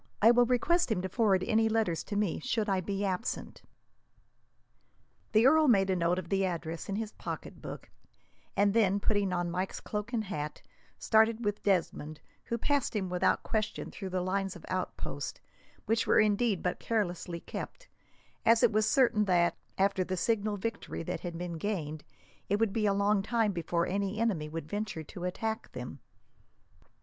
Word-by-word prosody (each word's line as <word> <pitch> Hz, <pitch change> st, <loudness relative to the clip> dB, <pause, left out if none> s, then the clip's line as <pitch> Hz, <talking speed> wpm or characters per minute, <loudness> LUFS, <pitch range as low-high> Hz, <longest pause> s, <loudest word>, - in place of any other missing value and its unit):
I 225 Hz, +3 st, +7 dB
will 240 Hz, 0 st, +5 dB
request 255 Hz, +5 st, +2 dB
him 220 Hz, -, +2 dB
to 190 Hz, -, -2 dB
forward 195 Hz, -3 st, +2 dB
any 225 Hz, +1 st, +3 dB
letters 215 Hz, -7 st, +1 dB
to 205 Hz, -, -4 dB
me, 205 Hz, -4 st, 0 dB
should 220 Hz, +6 st, -1 dB
I 190 Hz, -2 st, +1 dB
be 200 Hz, +2 st, -2 dB
absent." 190 Hz, +4 st, -3 dB, 1.7 s
The 220 Hz, +1 st, +5 dB
earl 310 Hz, +3 st, +6 dB
made 195 Hz, -6 st, +4 dB
a -, -, +2 dB
note 175 Hz, 0 st, +1 dB
of 180 Hz, -2 st, -5 dB
the 195 Hz, 0 st, +2 dB
address 170 Hz, -2 st, -3 dB
in 195 Hz, -, -1 dB
his 220 Hz, 0 st, -3 dB
pocketbook, -, -, -7 dB, 0.7 s
and 200 Hz, 0 st, +4 dB
then, 205 Hz, -3 st, +3 dB
putting 205 Hz, -2 st, +1 dB
on 175 Hz, -1 st, -1 dB
Mike's 185 Hz, +2 st, -2 dB
cloak 210 Hz, +2 st, -4 dB
and 230 Hz, -3 st, 0 dB
hat, 155 Hz, -7 st, -5 dB, 0.3 s
started 220 Hz, +1 st, +3 dB
with 205 Hz, 0 st, -1 dB
Desmond, 160 Hz, -5 st, 0 dB, 0.3 s
who 235 Hz, -, -2 dB
passed 280 Hz, 0 st, 0 dB
him 190 Hz, -3 st, -1 dB
without 180 Hz, -, +2 dB
question 215 Hz, -2 st, -2 dB
through 195 Hz, -2 st, -6 dB
the 185 Hz, 0 st, -1 dB
lines 195 Hz, +1 st, -1 dB
of 175 Hz, -, -11 dB
outposts; 185 Hz, 0 st, -4 dB, 0.5 s
which 225 Hz, +1 st, +1 dB
were -, -, +5 dB
indeed 210 Hz, -1 st, +2 dB
but 180 Hz, -, -1 dB
carelessly 175 Hz, -6 st, -2 dB
kept, -, -, -7 dB, 0.6 s
as 230 Hz, 0 st, +5 dB
it -, -, +6 dB
was 215 Hz, 0 st, +2 dB
certain 240 Hz, -6 st, +4 dB
that, 175 Hz, -3 st, +3 dB, 0.2 s
after 195 Hz, -1 st, +2 dB
the 185 Hz, 0 st, -3 dB
signal 210 Hz, +1 st, 0 dB
victory 225 Hz, -3 st, -4 dB
that 180 Hz, +2 st, -3 dB
had 170 Hz, -2 st, -5 dB
been 170 Hz, -1 st, -4 dB
gained, 155 Hz, -6 st, -3 dB, 0.5 s
it 205 Hz, -, +2 dB
would 225 Hz, -3 st, +1 dB
be 215 Hz, -2 st, +1 dB
a -, -, +4 dB
long 200 Hz, 0 st, +2 dB
time 225 Hz, 0 st, +1 dB
before 170 Hz, -1 st, -1 dB
any 200 Hz, +2 st, -1 dB
enemy 190 Hz, -10 st, 0 dB
would 160 Hz, -1 st, -5 dB
venture 205 Hz, -5 st, -3 dB
to 175 Hz, +4 st, -7 dB
attack 220 Hz, +4 st, -3 dB
them. -, -, -7 dB
200 Hz, 175 wpm, -31 LUFS, 180-220 Hz, 1.7 s, I